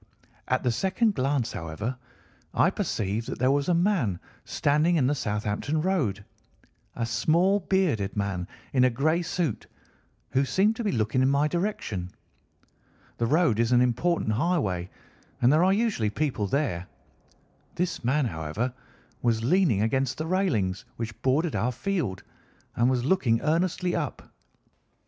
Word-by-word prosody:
At 130 - 0
the 125 - +2
second 190 - +1
glance, 130 - 0
however, 85 +10 -4 0.6
I - - +4
perceived 105 +3 -2
that - - -4
there 130 +2 +2
was 140 +3 +1
a 175 - +4
man 170 - +1 0.3
standing 150 +4 +2
in 145 -6 +3
the 140 - +2
Southampton 105 +4 -2
Road, 145 - 0 0.7
a 115 - -1
small 165 - +2
bearded 165 - 0
man 95 -3 -2 0.3
in 130 -2 +4
a - - +5
grey 155 +8 +1
suit, 165 - -2 0.6
who 135 +2 +2
seemed 200 +10 +2
to 235 - -3
be 210 - 0
looking 115 +2 +1
in 130 - +4
my 140 +2 +3
direction. 150 - -2 1.1
The 115 - +1
road 150 -5 +3
is 115 +1 +2
an 120 - +6
important 125 +2 +1
highway, 105 - 0 0.5
and 125 +4 +4
there 160 +3 +4
are 190 - +4
usually 200 - +1
people 120 -3 -1
there. 95 - -1 0.9
This 180 -4 -2
man, 135 +4 +2
however, 90 +7 -3 0.5
was 115 -2 +1
leaning 135 - +3
against 130 +3 0
the 155 - -3
railings 140 - 0
which 115 -1 -6
bordered 145 +5 +1
our 125 +3 +1
field 155 - -2 0.5
and 120 +2 +3
was 125 -1 0
looking 135 -9 +2
earnestly 175 +2 0
up. 150 -5 -4
130 Hz, 150 wpm, -26 LUFS, 110-170 Hz, 1.1 s, an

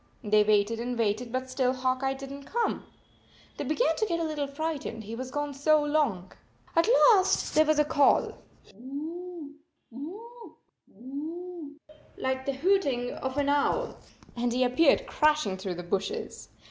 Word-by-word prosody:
They 210 -1 +4
waited 210 +2 +2
and 245 +1 -3
waited, 230 +2 0
but 255 +1 -2
still 255 -1 0
Hawk 255 0 -1
Eye 270 0 0
did 270 0 -8
not 280 0 -9
come. 470 0 -1 0.7
They - - -3
began 310 +3 +1
to 435 - +1
get 335 -3 -1
a - - -1
little 305 -3 -2
frightened, 285 -5 -4
he 215 +2 -8
was 255 +2 -5
gone 290 +1 -3
so 300 +2 +3
long. 285 - 0 0.4
At 330 +3 +4
last 450 -5 +4
there 310 +1 +5
was 310 -1 +3
a 300 - +4
call, 285 -1 +3
" - - -31
Hoo, 305 - -8 0.3
hoo, 440 - -10 0.3
hoooooo," 300 - -7 0.4
like 260 0 -2
the 275 - +1
hooting 275 -6 +1
of 265 +1 -5
an 285 -1 +1
owl, 290 - +1 0.4
and 240 0 -1
he 250 +2 +2
appeared 255 +5 +3
crashing 300 -10 +2
through 190 -1 -4
the 175 - -6
bushes. 195 +3 -3
280 Hz, 165 wpm, -28 LUFS, 245-310 Hz, 0.7 s, there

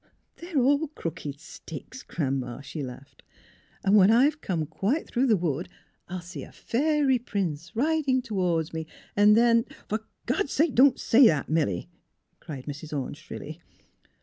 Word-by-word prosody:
'* - - -47
They're 340 -2 -5
all 285 +4 +3
crooked 155 - -6
sticks. - - -10
Gran 135 -4 -2
'ma," 125 +1 -6
she 140 +3 -6
laughed, 130 +1 -9 0.3
'' - - -33
and 195 +1 +5
when 195 -1 +7
I've 280 +7 +4
come 165 -5 -1
quite 200 - -1
through 260 +2 +1
the 220 -4 +4
wood 170 -2 -2 0.4
I'll 180 0 -5
see 175 +2 -8
a - - -10
fairy 280 0 +1
prince, 180 -9 -3
riding 275 -1 +1
toward 180 -8 -1
me, 160 -1 -4 0.3
and 210 +1 +6
then 230 0 +5
" - - -18
*' - - -30
For 215 - 0 0.3
God's 390 -8 0
sake, 310 -1 +2
don't 260 +1 +5
say 245 +2 +6
that, 150 -8 +1
Milly! 150 - 0 0.3
" - - -48
cried 135 -5 -8
Mrs. 150 +1 -5
Orne, 130 - -5
shrilly. - - -9
200 Hz, 175 wpm, -27 LUFS, -, 0.4 s, when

